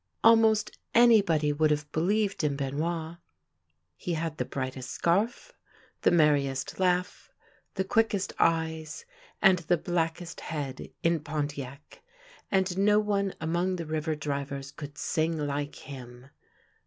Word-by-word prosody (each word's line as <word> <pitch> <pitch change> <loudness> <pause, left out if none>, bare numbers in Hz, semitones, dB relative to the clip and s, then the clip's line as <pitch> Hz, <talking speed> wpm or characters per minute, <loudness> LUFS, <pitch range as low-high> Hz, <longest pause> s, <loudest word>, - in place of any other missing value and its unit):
Almost 225 -1 +4 0.2
anybody 200 -11 +5
would 155 +1 +2
have 150 0 -1
believed 195 +3 0
in 145 -2 +1
Benoit. 160 +4 -3 0.8
He 175 - -3
had 160 -1 -3
the - - -1
brightest 130 -1 -5
scarf, 210 - 0 0.5
the - - +4
merriest 145 -4 +2
laugh, 180 0 0 0.5
the 190 - 0
quickest 200 -1 +1
eyes, 160 - 0 0.4
and 190 -3 +6
the 175 +1 +1
blackest 170 +1 -2
head 140 -5 -5
in 165 0 +3
Pontiac; 145 -2 -5 0.5
and 190 -1 +1
no 210 +1 +5
one 200 -2 0
among 175 +3 0
the 170 -2 -5
river 155 0 -2
drivers 140 -2 -4
could 145 -1 -9
sing 160 +1 0
like 145 -1 -3
him. 125 -1 -11
160 Hz, 125 wpm, -28 LUFS, 145-185 Hz, 0.8 s, and